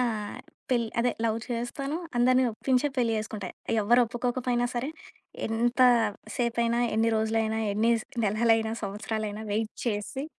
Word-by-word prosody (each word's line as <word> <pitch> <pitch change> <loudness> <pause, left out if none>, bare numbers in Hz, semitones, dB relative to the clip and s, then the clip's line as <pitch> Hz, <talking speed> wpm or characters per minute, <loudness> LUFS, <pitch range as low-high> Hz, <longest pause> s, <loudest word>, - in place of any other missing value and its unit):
ఆహ్, 220 -4 -2 0.3
పెళ్లి 235 -3 +2
అదే 245 +1 +2
లవ్ 225 -1 +1
చేస్తాను. 250 +5 -3 0.2
అందరిని 255 +1 +4
ఒప్పించే 260 +5 +1
పెళ్లి 235 -2 +2
చేసుకుంటా. 215 -3 -5 0.3
ఎవ్వరొప్పుకోకపోయినా 245 +2 +2
సరే, 245 +4 -1 0.6
ఎంత 235 +3 0 0.6
సేపైనా, 235 0 +1 0.2
ఎన్ని 225 +1 +3
రోజులైనా, 220 0 0
ఎన్ని 225 +3 +3
స్ - - -17 0.2
నెలలైనా, 220 +1 +2
సంవత్సరాలైనా, 210 +1 -3
వెయిట్ 220 +1 -1
చేసి 225 +6 -2
230 Hz, 120 wpm, -28 LUFS, 220-245 Hz, 0.6 s, అందరిని